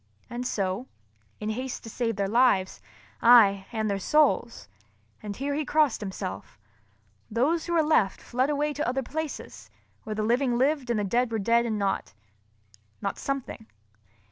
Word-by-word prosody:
And 245 +1 -3
so, 195 +4 -2 0.5
in 215 +1 -2
haste 255 +3 -5
to 225 - -8
save 230 -2 -1
their 200 0 -1
lives 210 -4 +2 0.4
(aye, 205 -5 +6
and 220 -2 -1
their 200 -1 -1
souls!—and 110 - -1
here 280 +4 -2
he 305 +2 -1
crossed 300 -5 +2
himself) 95 - -6 0.7
those 295 +10 +1
who 345 - -1
were 330 -2 +4
left 300 -11 +2
fled 255 +3 -1
away 295 0 0
to 295 +1 -2
other 260 +2 -1
places, 310 +3 -6 0.3
where 215 - -5
the 215 - -1
living 240 +2 +1
lived 270 0 +1
and 235 -3 +1
the - - 0
dead 235 +4 +1
were 225 - 0
dead 235 +3 +2
and 220 -2 -1
not—not 105 - -6
something. 270 -5 -4
230 Hz, 155 wpm, -27 LUFS, 195-265 Hz, 0.7 s, aye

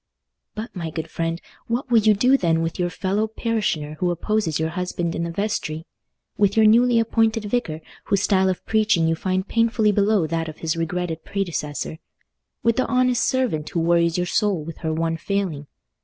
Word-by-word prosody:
But, 215 +1 -6
my 170 -3 -4
good 160 0 -6
friend, 165 0 -2 0.3
what 245 +2 -2
will 230 - +6
you 215 0 +4
do 250 +6 +4
then 165 -8 +1
with 165 +2 -4
your 175 0 +1
fellow 200 +4 -1
parishioner 210 -10 -2
who 180 - +1
opposes 175 -2 -1
your 160 0 0
husband 175 -1 -3
in - - -3
the 170 - -2
vestry? 165 -4 -3 0.5
With 205 0 +2
your 220 - +6
newly 235 +2 +5
appointed 225 -1 +1
vicar, 200 -8 -2 0.2
whose 200 -1 +1
style 190 -2 +3
of 185 - -3
preaching 215 -7 +2
you 165 - +2
find 185 +3 -1
painfully 230 -2 +2
below 205 -2 +2
that 165 0 -2
of 155 - -10
his 160 -1 -2
regretted 165 0 -3
predecessor? 160 -6 -3 0.6
With 230 -1 +2
the 255 - +1
honest 255 -1 +2
servant 240 - 0
who 170 - -2
worries 170 0 +2
your 180 - 0
soul 190 -2 0
with 165 +1 -8
her 160 - -2
one 165 +1 -1
failing? 170 -5 -2
185 Hz, 185 wpm, -23 LUFS, 165-220 Hz, 0.6 s, will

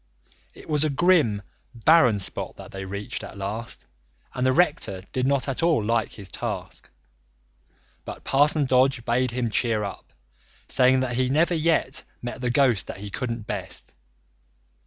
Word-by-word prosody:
It - - -14
was 150 -1 +1
a 155 - +1
grim, 140 - +3 0.3
barren 125 -2 +5
spot 95 - -3
that - - -11
they 95 0 -6
reached 100 +1 -5
at - - -9
last 105 +5 -5 0.5
and 125 - -2
the 130 - +4
rector 130 - +1
did 130 0 0
not 140 -1 +1
at 135 - -2
all 165 -9 +3
like 115 0 0
his 100 -3 -7
task. - - -4 1.1
But - - -8
Parson 145 +2 +3
Dodge 130 -1 +2
bade 125 +2 +1
him 120 -1 -2
cheer 110 -1 +1
up, 100 - -7 0.6
saying 130 0 +4
that 120 -2 -2
he 130 0 +1
never 160 +6 +2
yet 160 -4 +1 0.2
met 120 +1 -6
the 125 - 0
ghost 120 -6 +2
that - - -6
he 100 +1 -8
couldn't 115 -3 -4
best. 100 -4 -5
125 Hz, 160 wpm, -25 LUFS, 110-140 Hz, 1.1 s, barren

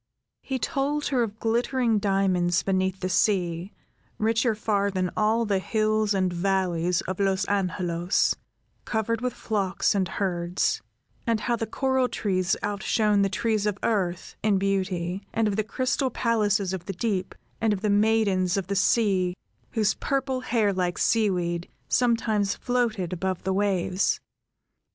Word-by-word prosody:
He 265 - -3
told 285 +3 -1
her 260 -4 +2
of 220 -1 -3
glittering 235 0 +1
diamonds 185 -4 +1
beneath 190 0 0
the 185 - -1
sea, 180 -2 +1 0.5
richer 225 +1 +1
far 205 -2 0
than 185 -2 -1
all 220 +2 +2
the 200 -2 +1
hills 215 0 +1
and 185 -2 +1
valleys 180 -2 +1
of 185 +1 -5
Los 195 -1 +1
Angelos, 180 -3 +1 0.5
covered 225 +1 -1
with 250 0 0
flocks 200 -4 0
and 195 -2 +1
herds; 175 -2 -1 0.5
and 225 -2 +1
how 240 - +1
the 225 -1 -3
coral 260 +2 +1
trees 185 -3 0
outshone 205 +1 +1
the 195 - +2
trees 215 0 0
of 205 -2 -1
earth, 185 -5 -1
in 210 -2 +2
beauty, 190 -2 -1
and 225 -1 +2
of 205 - 0
the 215 - +1
crystal 255 +5 0
palaces 210 -5 +1
of 180 -2 -5
the 195 - -4
deep, 190 -1 -2 0.3
and 225 -1 +3
of 200 -2 -1
the 210 - 0
maidens 205 -3 +2
of 195 - -1
the 200 +2 -3
sea, 195 -3 +2 0.4
whose, 215 -3 +2
purple 270 -1 -1
hair 225 -5 +1
like 180 -1 -1
sea 220 -2 +3
weed, 175 -2 -2 0.2
sometimes 225 -4 +1
floated 225 -8 -1
above 185 0 -2
the 190 - 0
waves. 190 -1 +1
200 Hz, 150 wpm, -26 LUFS, 185-225 Hz, 0.5 s, and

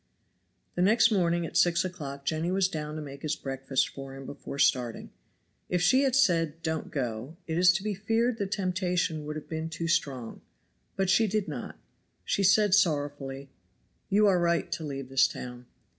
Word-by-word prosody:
The 175 - -2
next 225 +5 +5
morning 175 -4 +1
at - - -8
six 175 +1 +3
o'clock 140 -6 -6
Jenny 160 +3 -1
was 190 0 +2
down 155 -4 -5
to 155 - -5
make 140 -1 -9
his 155 -1 -1
breakfast 135 0 -1
for 135 -1 -9
him 135 0 -9
before 140 - -8
starting. 125 -4 +1 0.6
If 180 - +1
she 260 +8 +5
had 270 -3 +2
said, 165 - +2
"Don't 160 -1 -2
go," 125 +3 -4
it 160 - -3
is 180 +1 +6
to 190 +2 -2
be 210 -1 -1
feared 225 +4 0
the 200 - -1
temptation 180 -5 -1
would 150 - -4
have 155 - -7
been 160 0 -4
too 165 +1 -4
strong, 130 -8 -1 0.5
but 190 -1 +1
she 225 +3 +4
did 210 -1 -1
not; 140 -6 -6 0.5
she - - 0
said 200 +1 +4
sorrowfully, 145 -7 0 0.6
"You 210 +2 +4
are 190 -3 +4
right 170 0 +1
to 170 -1 -3
leave 135 -3 -5
this 135 0 +4
town." 125 0 -8
165 Hz, 185 wpm, -28 LUFS, 140-190 Hz, 0.6 s, is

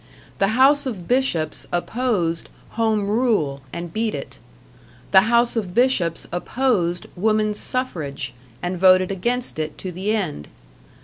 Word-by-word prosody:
The 200 +4 +2
House 280 +1 +5
of 195 -9 -5
Bishops 210 - 0
opposed 175 -4 -1 0.2
Home 220 -2 0
Rule, 205 - +1
and 170 -1 -6
beat 220 0 -1
it; - - -8 0.7
The 195 +3 +6
House 235 0 +3
of 200 -5 -3
Bishops 220 -10 +2
opposed 175 -3 0
Womans' 215 +2 +1
Suffrage, 155 - -3 0.3
and 175 0 -2
voted 185 0 +5
against 240 +1 -1
it 155 0 -3
to 185 - -5
the 195 +5 -1
end. 155 - -3
200 Hz, 130 wpm, -22 LUFS, 175-235 Hz, 0.7 s, The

